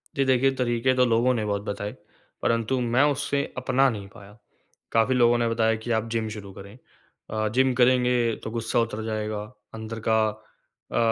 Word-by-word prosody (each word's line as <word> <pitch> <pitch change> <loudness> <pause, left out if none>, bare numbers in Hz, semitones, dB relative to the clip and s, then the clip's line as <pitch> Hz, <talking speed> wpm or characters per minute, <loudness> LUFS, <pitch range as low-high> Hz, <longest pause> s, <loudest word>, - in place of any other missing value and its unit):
जी, 135 - +1
देखिए 130 +1 +3
तरीके 125 0 +1
तो 125 0 +4
लोगों 120 +2 +3
ने 110 -3 -1
बहुत 100 -1 -1
बताए, 100 0 -4 0.5
परंतु 115 +3 0
मैं 120 +3 +2
उससे 140 0 -1
अपना 130 +1 +2
नहीं 105 -5 -6
पाया। 100 +1 -14 0.5
काफ़ी 115 +3 +2
लोगों 120 -1 +4
ने 120 -1 +1
बताया 115 -1 +2
कि 110 +2 -5
आप 110 0 0
जिम 115 -1 -1
शुरू 105 -2 -8
करें। 100 +4 -12 0.5
अ, 110 0 -1
जिम 130 0 +3
करेंगे 125 -2 +3
तो 110 - -5
गुस्सा 115 0 -1
उतर 115 -1 -2
जाएगा, 110 -1 -3 0.3
अंदर 110 0 -6
का 110 0 +4 0.7
अ, - - -2
115 Hz, 180 wpm, -25 LUFS, 110-125 Hz, 0.7 s, तो